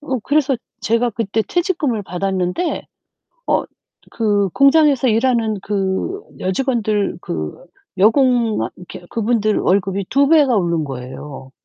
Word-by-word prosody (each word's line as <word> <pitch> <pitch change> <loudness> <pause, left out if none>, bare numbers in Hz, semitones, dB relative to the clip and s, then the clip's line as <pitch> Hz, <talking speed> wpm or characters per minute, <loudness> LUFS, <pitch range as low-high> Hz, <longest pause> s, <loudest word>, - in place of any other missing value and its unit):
어 270 -3 -2
그래서 285 -1 +1 0.2
제가 230 +2 +1
그때 220 0 -1
퇴직금을 340 - -1
받았는데 185 - -2 0.6
어 - - +1 0.5
그 205 -3 +1
공장에서 275 - +4
일하는 230 -2 +1
그 200 - -2 0.2
여직원들 215 -1 -1
그 80 -2 -4 0.5
여공 235 +1 +3 0.2
이렇게 180 0 -11
그분들 220 -1 +1
월급이 195 0 0
2 280 +1 +3
배가 295 -6 +5
오른 170 -4 0
거예요. 130 +1 -8
220 Hz, 255 characters per minute, -19 LUFS, 190-265 Hz, 0.6 s, 배가